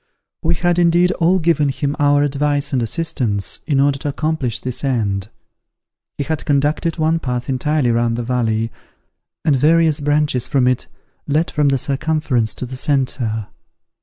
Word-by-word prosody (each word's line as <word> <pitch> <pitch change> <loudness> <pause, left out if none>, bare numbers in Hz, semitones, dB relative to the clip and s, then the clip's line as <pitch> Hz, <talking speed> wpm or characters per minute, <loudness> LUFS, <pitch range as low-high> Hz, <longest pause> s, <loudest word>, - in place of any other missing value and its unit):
We 170 +1 +1
had, 175 +1 +1
indeed, 175 +1 +4
all 175 +3 +4
given 160 -4 +2
him 140 +1 -2
our 145 0 +4
advice 145 0 0
and 130 - +2
assistance, 120 - -2
in 140 -4 +2
order 140 0 +2
to 145 - -3
accomplish 145 -4 -2
this 125 +1 -5
end. 105 -7 -1 0.9
He 145 - -1
had 160 +1 -3
conducted 150 +4 0
one 160 +1 +1
path 125 -4 -3
entirely 135 0 +1
round 115 0 +1
the 120 - -2
valley, 115 -2 -1 0.7
and 150 -4 +4
various 160 +2 +3
branches 145 -3 +1
from 135 -3 +2
it 125 0 0 0.4
led 155 +3 +1
from 150 -1 +2
the 135 - +2
circumference 135 -4 0
to - - -5
the 130 +1 -7
centre. 125 -6 -1
140 Hz, 160 wpm, -19 LUFS, 125-155 Hz, 0.9 s, indeed